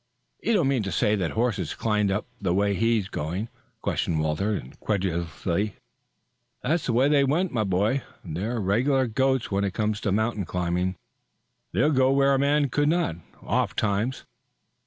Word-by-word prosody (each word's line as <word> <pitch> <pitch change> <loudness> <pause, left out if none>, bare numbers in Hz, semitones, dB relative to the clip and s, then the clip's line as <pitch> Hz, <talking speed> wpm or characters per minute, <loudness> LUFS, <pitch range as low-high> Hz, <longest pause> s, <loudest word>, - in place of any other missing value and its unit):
"You 230 - +1
don't 175 -10 +3
mean 135 -3 +2
to 100 -2 -3
say 105 - +2
that 90 -4 -1
horses 110 -8 -1
climbed 105 -2 +1
up 100 +2 -1 0.2
the 90 -3 +1
way 100 +1 +2
he 115 +3 +2
is 100 -3 -2
going!" 90 +7 -3 0.3
questioned 80 -2 0
Walter 80 +8 0
incredulously. 90 - -2 0.9
"That's 155 +5 0
the 120 - +1
way 130 +4 +4
they 145 -1 +4
went, 165 +7 +1
my 115 -4 0
boy. 105 +7 +1 0.2
They 90 +5 -3
're 120 +1 -2
regular 125 +7 +2
goats 130 +2 0
when 100 +1 +1
it 100 -1 -2
comes 105 -1 -1
to 100 - 0
mountain 110 -1 0
climbing. 90 +1 -1 0.8
They'll 150 +5 +2
go 130 -2 +4
where 140 0 +4
a 135 - +2
man 145 0 +2
could 145 +3 +2
not, 165 - +1 0.3
oftentimes." 110 +5 0
110 Hz, 170 wpm, -26 LUFS, 95-130 Hz, 0.9 s, way